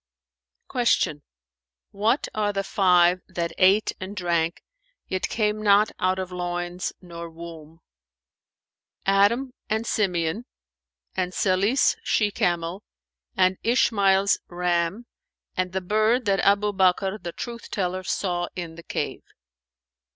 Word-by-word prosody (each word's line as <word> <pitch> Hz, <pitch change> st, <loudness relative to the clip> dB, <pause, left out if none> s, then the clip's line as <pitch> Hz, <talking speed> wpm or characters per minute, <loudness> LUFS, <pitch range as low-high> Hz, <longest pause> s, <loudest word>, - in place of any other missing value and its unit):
'"[FN#432] 245 Hz, -2 st, +3 dB
Q 145 Hz, -1 st, -4 dB, 0.7 s
"What 220 Hz, +7 st, +1 dB
are 210 Hz, -1 st, 0 dB
the 195 Hz, -1 st, -2 dB
five 180 Hz, -2 st, +4 dB
that 170 Hz, -1 st, -3 dB
ate 195 Hz, +3 st, +4 dB
and 190 Hz, +2 st, -6 dB
drank, 170 Hz, -3 st, -1 dB, 0.4 s
yet 185 Hz, -, -2 dB
came 215 Hz, -1 st, 0 dB
not 205 Hz, 0 st, +4 dB
out 185 Hz, 0 st, +1 dB
of 185 Hz, -1 st, -4 dB
loins 175 Hz, 0 st, -3 dB
nor 170 Hz, -1 st, -8 dB
womb?" 165 Hz, -1 st, -11 dB, 1.2 s
"Adam 205 Hz, +7 st, +3 dB, 0.2 s
and 220 Hz, +2 st, 0 dB
Simeon[FN#433] 180 Hz, -1 st, 0 dB, 0.7 s
and 180 Hz, -1 st, -1 dB
Salih's 200 Hz, +7 st, +2 dB
she 210 Hz, -2 st, +1 dB
camel[FN#434] 175 Hz, 0 st, -1 dB, 0.6 s
and 185 Hz, 0 st, +3 dB
Ishmael's 200 Hz, -5 st, +3 dB
ram 175 Hz, +4 st, -1 dB, 0.5 s
and 185 Hz, 0 st, -1 dB
the 190 Hz, +1 st, -2 dB
bird 215 Hz, +6 st, +2 dB
that 195 Hz, -1 st, +2 dB
Abu 205 Hz, +1 st, +3 dB
Bakr 190 Hz, +1 st, +2 dB
the 175 Hz, -1 st, -5 dB
Truth 235 Hz, +5 st, -7 dB
teller 185 Hz, -1 st, -2 dB
saw 175 Hz, -2 st, -1 dB
in 170 Hz, -3 st, -5 dB
the 170 Hz, +1 st, -12 dB
cave. -, -, -3 dB
185 Hz, 120 wpm, -25 LUFS, 175-210 Hz, 1.2 s, five